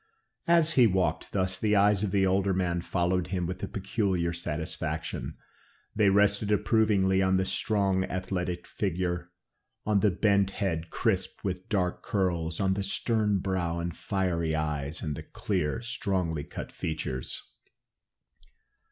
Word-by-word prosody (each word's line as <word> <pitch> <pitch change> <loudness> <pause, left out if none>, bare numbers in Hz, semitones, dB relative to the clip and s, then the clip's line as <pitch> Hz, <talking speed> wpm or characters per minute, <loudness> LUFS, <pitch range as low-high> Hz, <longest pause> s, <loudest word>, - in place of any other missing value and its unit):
As 170 -1 +4
he 125 -5 +6
walked 95 -2 0
thus, 95 -1 0
the 105 -1 +2
eyes 100 0 +4
of 105 - 0
the 95 0 +2
older 95 0 +2
man 90 -2 0
followed 90 0 0
him 90 -2 -2
with 90 +2 -5
a - - -2
peculiar 95 -3 -1
satisfaction. 80 -2 -4 0.6
They 105 -2 +4
rested 100 +1 +3
approvingly 105 -3 +3
on 95 0 +3
the 95 - +1
strong 95 -3 +1
athletic 90 -1 -3
figure, 90 -2 -2 0.6
on 105 -1 +3
the 105 - +4
bent 100 0 +2
head 85 -4 -1
crisped 95 -5 -1
with 95 +1 -4
dark 95 -5 0
curls, 85 -5 -1
on 95 -1 +2
the 100 - -2
stern 105 +1 +1
brow 90 -3 -1
and 85 0 -3
fiery 85 -5 -1
eyes, 75 -1 -2
and 75 -3 -2
the - - -6
clear, 75 +11 -2
strongly 95 -10 -1
cut - - -7
features. 65 -5 -4
95 Hz, 145 wpm, -28 LUFS, 85-100 Hz, 0.6 s, he